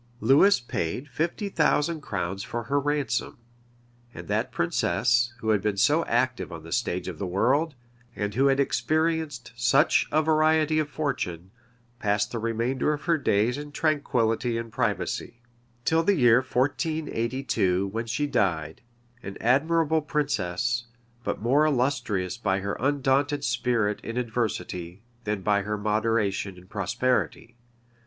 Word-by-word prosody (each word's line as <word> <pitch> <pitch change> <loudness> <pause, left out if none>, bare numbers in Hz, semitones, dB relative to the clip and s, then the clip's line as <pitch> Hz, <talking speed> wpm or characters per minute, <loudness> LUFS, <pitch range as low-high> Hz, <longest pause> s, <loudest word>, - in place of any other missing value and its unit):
Lewis 140 - +5
paid 120 - -3
fifty 165 - -2
thousand 160 -3 +1
crowns 95 -5 -3
for 120 +3 -4
her 140 +5 0
ransom; 145 0 -1 0.8
and - - -8
that - - -1
princess, 120 +6 +1
who 110 - -2
had 105 -3 +3
been 105 -1 -1
so 150 +10 +3
active 125 -2 0
on 85 -2 -8
the 80 - -11
stage 105 -7 -1
of 90 -4 -6
the 100 - -2
world, 135 - +1 0.4
and 105 0 -3
who 135 +5 +3
had 135 0 +2
experienced 155 -2 0
such 120 +7 +3
a 155 +1 +3
variety 155 0 +3
of 150 -1 -1
fortune, 95 - -3 0.5
passed 105 -1 0
the 115 - -3
remainder 115 +5 0
of 150 - -6
her 170 -1 +2
days 125 -2 +1
in 145 0 -8
tranquility 125 -7 0
and 115 -1 -5
privacy, 110 -1 -2 0.5
till 160 0 +3
the 195 +4 +2
year 120 -6 +5
1482, 130 - 0
when 115 +3 -4
she 130 +6 -1
died; 90 - -1 0.4
an 95 0 -7
admirable 160 +5 +2
princess, 120 - -1 0.4
but - - -3
more 135 +6 +4
illustrious 125 -10 0
by 95 -4 0
her 100 +1 -2
undaunted 140 +1 +1
spirit 115 -7 0
in 115 +1 -6
adversity, 110 -6 -3 0.2
than 105 -2 -2
by 100 0 +2
her 105 +2 -3
moderation 105 -2 0
in 90 - -14
prosperity. 110 +4 -1
120 Hz, 140 wpm, -26 LUFS, 105-145 Hz, 0.8 s, Lewis